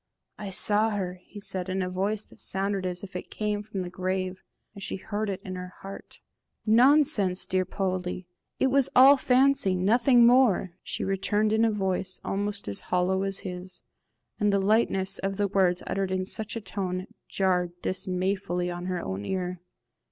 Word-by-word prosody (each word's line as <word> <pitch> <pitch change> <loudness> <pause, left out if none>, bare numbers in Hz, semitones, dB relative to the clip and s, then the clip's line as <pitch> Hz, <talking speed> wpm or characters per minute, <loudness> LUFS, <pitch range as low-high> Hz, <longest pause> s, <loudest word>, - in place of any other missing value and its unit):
"I 205 -2 -5
saw 210 +3 +3
her!" 185 -4 -3
he 205 - -11
said, 185 -2 -2
in 185 0 -1
a - - -2
voice 200 +3 -1
that - - -19
sounded 195 0 -1
as 180 +1 -4
if 190 -2 -9
it 180 - -6
came 210 -1 -2
from 205 -3 -5
the 175 - -6
grave, 185 +1 -3 0.3
and 200 - -11
she - - -4
heard 205 +2 -3
it 190 -1 -3
in 185 - -5
her 180 0 -7
heart. 195 0 -10 0.4
"Nonsense, 235 -5 +4
dear 185 0 0
Poldie! 185 -1 -3 0.3
it 265 - +2
was 275 0 +3
all 270 +3 +9
fancy 265 -6 +3
nothing 235 +6 +4
more," 240 -7 +4
she - - -4
returned, 205 +2 0
in 220 +1 +3
a 230 - +4
voice 190 -3 -2
almost 205 0 -3
as 100 - -1
hollow 180 +1 +1
as 195 0 -3
his; 180 -1 -7 0.6
and 210 -1 +3
the 200 - +3
lightness 195 -1 +1
of 195 0 -2
the 205 -1 +1
words 185 -2 +1
uttered 195 -1 -1
in 185 0 -1
such 220 +4 -4
a 230 - -4
tone 185 -2 -3 0.2
jarred 180 -2 0
dismayfully 185 -1 -1
on 175 +1 -5
her 180 -1 -2
own 95 +2 -4
ear. 180 - -3
195 Hz, 180 wpm, -27 LUFS, 185-210 Hz, 0.6 s, all